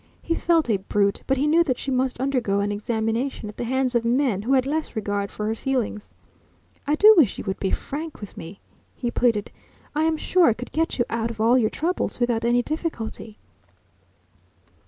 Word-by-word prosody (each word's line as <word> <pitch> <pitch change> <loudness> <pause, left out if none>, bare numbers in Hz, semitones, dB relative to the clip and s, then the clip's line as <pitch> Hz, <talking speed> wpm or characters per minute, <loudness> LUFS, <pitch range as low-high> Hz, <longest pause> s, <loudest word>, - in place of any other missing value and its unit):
He 335 - 0
felt 330 -2 +2
a 215 -4 +2
brute, 200 +1 0
but 270 - +2
he 275 - +1
knew 325 +3 +4
that 255 -7 -1
she 275 - -4
must 255 -1 0
undergo 250 -7 0
an 205 +1 0
examination 225 +3 -2
at 210 - -11
the 240 - -3
hands 260 +1 0
of 235 -1 +2
men 235 -4 +1
who 245 +6 0
had 260 -1 +3
less 305 +1 -2
regard 205 -2 -2
for 210 - -5
her 220 - 0
feelings. 235 -4 -3 0.7
"I 295 - +3
do 425 +7 +8
wish 295 - +4
you - - -5
would 195 -1 -4
be 190 - -1
frank 310 +9 -4
with 205 - -9
me," 170 +5 -10 0.3
he 240 -2 -3
pleaded. 230 -5 +1 0.4
"I 305 +1 +1
am 320 -1 +1
sure 365 +2 +3
I 235 - +4
could 245 +3 -9
get 325 +1 -1
you 240 - +1
out 230 0 -1
of 225 -2 -8
all 230 +3 +4
your 230 -4 +3
troubles 345 -2 -2
without 240 -2 0
any 240 +1 +2
difficulty." 240 -9 -5
245 Hz, 205 wpm, -24 LUFS, 220-280 Hz, 0.7 s, do